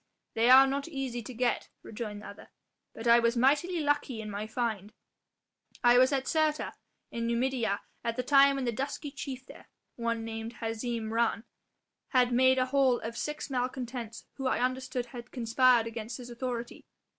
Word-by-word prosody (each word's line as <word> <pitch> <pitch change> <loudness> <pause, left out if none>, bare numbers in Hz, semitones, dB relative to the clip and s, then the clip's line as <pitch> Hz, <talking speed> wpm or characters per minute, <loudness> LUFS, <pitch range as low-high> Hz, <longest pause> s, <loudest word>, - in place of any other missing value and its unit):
"They 230 +2 +3
are 265 +1 +9
not 275 +2 -2
easy 270 -6 -4
to 245 - -8
get," 245 0 -1
rejoined 210 -2 -6
the - - -8
other, 200 - -12 0.5
"but 225 - -8
I 235 0 +7
was 235 +1 +1
mightily 295 +7 +2
lucky 290 -5 0
in 215 -1 -6
my 205 +2 -4
find. 220 -3 -3 0.9
I 245 0 +6
was 255 +2 +5
at 270 -1 0
Cirta 310 -2 0 0.4
in 230 0 -2
Numidia 235 -3 0 0.2
at 230 0 -2
a 250 - 0
time 275 +1 +5
when 270 -2 -2
the 240 - +1
dusky 280 +4 -4
chief 265 -2 -7
there - - -14 0.3
one 230 -1 -2
named 225 +1 -6
Hazim 225 0 -3
Rhan 230 0 +1 0.6
had 250 -2 +3
made 260 +1 +5
a 255 - +3
haul 260 -2 +3
of 230 +1 -5
six 300 +2 -4
malcontents 245 -3 -4
who 270 - -2
I - - +1
understood 255 0 -1
had 240 0 -10
conspired 240 0 +3
against 230 +1 -6
his 245 -1 -9
authority. 240 -1 -5
245 Hz, 175 wpm, -30 LUFS, 230-265 Hz, 0.9 s, are